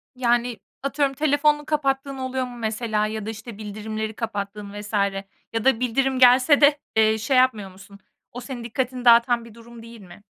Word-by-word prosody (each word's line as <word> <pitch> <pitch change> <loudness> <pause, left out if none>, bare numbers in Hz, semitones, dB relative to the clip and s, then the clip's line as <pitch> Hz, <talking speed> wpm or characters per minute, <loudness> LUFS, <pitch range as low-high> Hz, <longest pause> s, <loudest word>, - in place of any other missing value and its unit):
Yani, 240 -2 0 0.2
atıyorum, 275 0 0
telefonunu 295 0 +2
kapattığın 275 -2 -1
oluyor 260 0 -3
mu 245 -1 -10
mesela 220 -1 -1
ya 215 -1 -5
da 220 - -4
işte 225 0 -9
bildirimleri 215 +1 -5
kapattığın 205 -2 -5
vs. 210 +1 -11 0.6
ya 225 +2 -2
da 265 -4 +3
bildirim 260 +2 0
gelse 255 +4 +6
de, 285 0 +5 0.2
eee, 220 0 +3
şey 240 +5 0
yapmıyor 220 -7 +2
musun? 195 +1 -16 0.3
O 245 - -8
senin 245 -3 -7
dikkatini 250 +1 -3
dağıtan 235 0 +5
bir 225 - -14
durum 230 0 -14
değil 230 -2 -12
mi? 185 +2 -15
235 Hz, 175 wpm, -23 LUFS, 215-260 Hz, 0.6 s, gelse